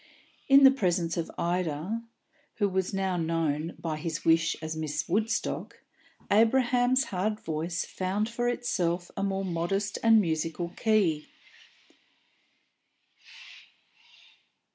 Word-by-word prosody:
In 275 0 +7
the 270 - +9
presence 175 -9 0
of 170 -2 -3
Ida 175 +4 -2 0.5
(who 205 - +1
was 190 -1 -1
now 190 -2 -1
known, 165 -1 -1
by 160 -2 -4
his 160 0 -4
wish, 165 -1 +3
as 160 0 -5
Miss 155 -2 -3
Woodstock) 220 +5 -1 0.5
Abraham's 245 +3 +3
hard 210 +4 -1
voice 165 +1 -3
found 195 +3 -2
for 240 +1 -1
itself 180 -8 -1
a - - -3
more 195 0 -1
modest 190 +4 -2
and 225 -1 +6
musical 165 -1 -1
key. 180 -7 +1
185 Hz, 110 wpm, -28 LUFS, 165-215 Hz, 0.5 s, the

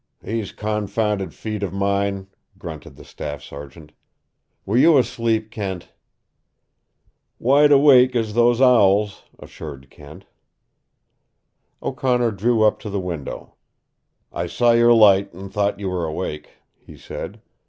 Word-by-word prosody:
"These 110 -2 -4
confounded 105 -1 -2
feet 110 -2 -6
of 100 -4 -3
mine!" 100 0 -1 0.3
grunted - - -9
the - - -15
staff 75 -1 -7
sergeant. 70 +2 -11 0.7
"Were 105 - -2
you 155 +5 +6
asleep, 115 -3 -1
Kent?" 95 -4 -6 1.5
"Wide 145 +4 +4
awake 135 -3 +6
as 110 -3 -1
those 120 +1 +3
owls," 105 -6 +3
assured 70 -4 -11
Kent. - - -14 1.6
O'Connor 125 -3 0
drew 110 +3 +1
up 105 - +2
to 105 - -7
the 100 0 -3
window. 85 -6 -6 0.8
"I 85 - -3
saw 120 +7 +2
your 120 0 +4
light 100 -3 +5
and 95 +1 -10
thought 100 -1 -1
you 100 - -4
were 90 -2 -2
awake," 75 -1 -5 0.3
he - - -15
said. - - -8
105 Hz, 125 wpm, -21 LUFS, 95-120 Hz, 1.6 s, you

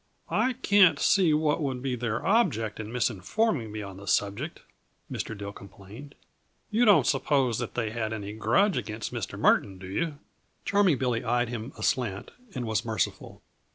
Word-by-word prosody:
"I 255 - +2
can't 200 -6 +5
see 185 -5 +3
what 150 +1 +1
would 130 -3 -2
be 130 -2 -1
their 115 -2 -3
object 115 - +1
in 110 - -5
misinforming 125 - 0
me 105 0 -5
on 100 -1 -9
the 100 +1 -11
subject," 105 +11 -1 0.5
Mr. 110 - -4
Dill 100 0 -6
complained. 100 +9 -12 0.6
"You 230 +3 +3
don't 205 -3 +6
suppose 130 -6 +1
that - - -5
they 115 -3 -1
had 110 -1 -3
any 105 -2 -5
grudge 195 - +2
against 110 -1 -4
Mr. - - -4
Murton, 95 -2 +2
do 95 - -10
you?" 145 - -2 0.5
Charming 200 -7 +3
Billy 125 -2 -1
eyed 120 0 +1
him 120 +1 -5
aslant 110 -7 -1 0.2
and 125 -2 -3
was 110 -4 0
merciful. 110 -1 -3
120 Hz, 165 wpm, -27 LUFS, 105-150 Hz, 0.6 s, don't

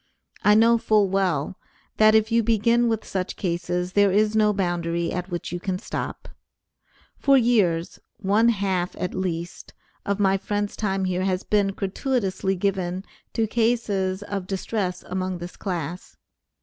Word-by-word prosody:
I 210 - +5
know 230 +1 +5
full 210 -3 +3
well, 185 -4 0 0.4
that 215 0 +6
if 220 +1 +3
you 230 0 +4
begin 230 +2 +2
with 225 -1 -1
such 185 -1 -3
cases, 180 0 -2
there 205 -1 +4
is 210 +2 +2
no 215 -1 +4
boundary 170 -3 -1
at 180 +1 -4
which 175 -1 -4
you 175 - -3
can 185 -1 -2
stop. - - -5 0.9
For 275 -1 +5
years, 205 -9 +2 0.2
one 210 +3 +3
half 190 -5 -1
at 180 - -3
least, 175 -2 -4 0.3
of 200 0 -1
my 195 -1 +3
friend's 205 +1 -2
time 195 -2 -1
here 185 0 -1
has 185 -1 0
been 205 -2 +2
gratuitously 195 0 -1
given 185 -1 -2 0.3
to 225 - +1
cases 210 -4 0
of 200 -3 -4
distress 190 -1 -3
among 185 0 -3
this 175 +1 -8
class. 175 -2 -5
195 Hz, 150 wpm, -24 LUFS, 180-215 Hz, 0.9 s, that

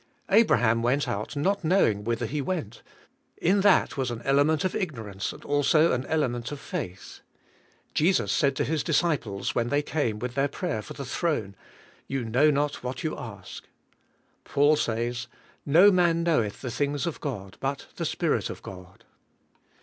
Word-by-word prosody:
Abraham 125 - +4
went 130 +4 +1
out 110 +3 -3
not 195 +7 0
knowing 155 - +2
whither 115 +2 -1
he 145 +6 -2
went; 135 - -4 0.6
in 195 +3 +2
that 195 -6 +3
was 130 -2 0
an 120 -1 -5
elenrjent 145 +4 +2
of 185 - 0
ignor 145 - -3
ance 95 +1 -3
and - - -13
also 155 +3 +3
an 125 +1 -1
element 125 -7 -1
of 145 - -6
faith. 90 -7 -6 0.7
Jesus 180 +5 +2
said 140 -2 +2
to - - 0
His 155 0 -1
discpies 145 - 0
when 120 0 0
they 145 +2 +1
came 135 -9 -1
with 125 +2 -4
their 140 +1 +1
prayer 145 -5 -3
for - - -9
the 140 - -7
throne, 130 - -2 0.5
"You 135 -3 -2
know 130 +7 +3
not 145 0 0
what 125 0 -5
you 155 - -2
ask." 100 -6 -9 0.8
Paul 145 +2 +3
says, 120 -2 -2 0.4
"No 175 +8 +7
man 170 -2 +3
knoweth 135 -12 0
the 125 - -4
things 145 +4 -1
of 170 - -4
God 100 -9 -5
but 135 +1 -3
the - - -2
Spirit - - 0
of - - -8
God." 90 0 -11
140 Hz, 170 wpm, -26 LUFS, 115-155 Hz, 0.8 s, No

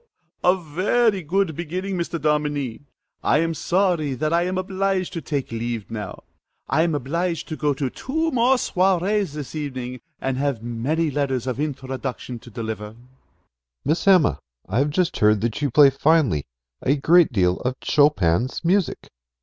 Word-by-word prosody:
A 180 +1 +5
very 190 +6 +1
good 175 0 0
beginning, 185 +4 -3
Mr. 170 -1 -2
Dominie. 145 -4 -1 0.4
I - - +3
am 165 +1 +1
sorry 170 -5 +1
that 155 +4 -1
I 170 +1 +3
am 185 0 -2
obliged 190 0 -1
to 165 - -4
take 140 -6 -3
leave 115 -2 -4
now: 105 -2 -6 0.4
I 160 - +2
am 165 -2 +1
obliged 165 +5 -2
to 155 - -3
go 145 -2 0
to 135 0 -1
two 320 +4 -2
more 250 +1 +4
soirées 190 - +1
this 150 -3 -6
evening, 130 -5 -5 0.2
and 135 -1 -2
have 140 -5 -1
many 140 +8 -1
letters 135 -3 -1
of 130 0 -3
introduction 130 -4 -4
to 120 - -14
deliver. 110 -2 -5
MR. - - -20
SILVER. 120 +2 -21 0.8
Miss 155 +7 0
Emma, 185 -6 +5 0.3
I 105 +6 0
have 145 +2 +2
just 180 +3 0
heard 105 -1 +4
that 115 +4 -2
you 145 - +1
play 140 +2 +6
finely 135 - +2 0.3
a 140 - +2
great 165 +3 +4
deal 90 -5 +2
of 125 +1 -2
Chopin's 130 - +2
music. 185 0 +1
150 Hz, 165 wpm, -23 LUFS, 125-175 Hz, 0.8 s, play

